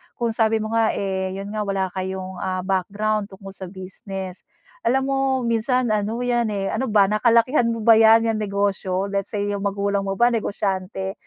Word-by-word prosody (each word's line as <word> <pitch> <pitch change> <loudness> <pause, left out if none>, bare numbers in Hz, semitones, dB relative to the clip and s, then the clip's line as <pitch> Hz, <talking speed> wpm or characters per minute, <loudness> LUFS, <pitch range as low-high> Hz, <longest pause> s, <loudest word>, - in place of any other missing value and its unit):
kung 235 -1 -1
sabi 220 -1 +1
mo 215 - -4
nga 225 -1 +2
eh, 190 -1 -2
yun 195 +1 -6
nga 210 -1 -3
wala 190 -2 -1
kayong 185 0 -5
ah, 185 -1 -2
background 200 +3 -1
tungkol 195 0 -11
sa 190 -1 -8
business. 190 0 -7 0.3
Alam 265 - +2
mo 270 - +1 0.3
minsan 235 +1 +1
ano 215 +2 -1
yan 240 -2 +1
eh, 195 -2 -2
ano 265 - -1
ba? 205 -2 +5
Nakalakihan 230 +4 +3
mo 230 -1 -3
ba 230 - +8
yan 225 +1 +6
yan 215 - -2
negosyo? 200 -2 -1
Let's 200 0 -2
say 205 -1 -2
yung 205 -1 -2
magulang 200 0 0
mo 195 -1 -3
ba 240 0 +4
negosyante? 195 -3 -2
200 Hz, 185 wpm, -22 LUFS, 195-225 Hz, 0.3 s, ba